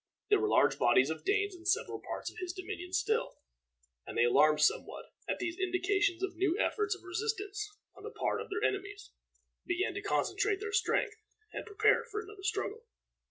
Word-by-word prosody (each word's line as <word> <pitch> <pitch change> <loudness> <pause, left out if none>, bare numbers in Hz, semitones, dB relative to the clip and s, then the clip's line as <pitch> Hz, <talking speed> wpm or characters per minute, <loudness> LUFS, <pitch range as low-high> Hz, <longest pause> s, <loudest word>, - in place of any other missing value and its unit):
There 410 - +6
were 425 - +1
large - - +3
bodies 130 +4 +4
of 160 - -5
Danes 405 0 +1
in 350 0 -10
several 435 +5 +1
parts - - -5
of - - -11
his 360 -1 -3
dominions 360 -1 -4
still, 450 +3 0 0.7
and - - -6
they, 120 - +5
alarmed 150 +5 +5
somewhat 150 - 0 0.2
at - - 0
these 355 0 -3
indications 375 0 +1
of 380 -2 -2
new 365 0 +1
efforts 425 -2 +1
of 390 - -16
resistance 415 +2 -3 0.3
on - - -14
the - - -6
part - - -1
of - - -8
their 425 +2 -2
enemies, 400 +1 -5 0.5
began 365 +1 -1
to 400 - -4
concentrate 405 0 +1
their 425 0 -5
strength 425 +1 +1 0.4
and - - -5
prepare 430 +2 +3
for 435 -3 -5
another 420 -2 -9
struggle. 410 +3 -2
395 Hz, 185 wpm, -32 LUFS, 360-420 Hz, 0.7 s, There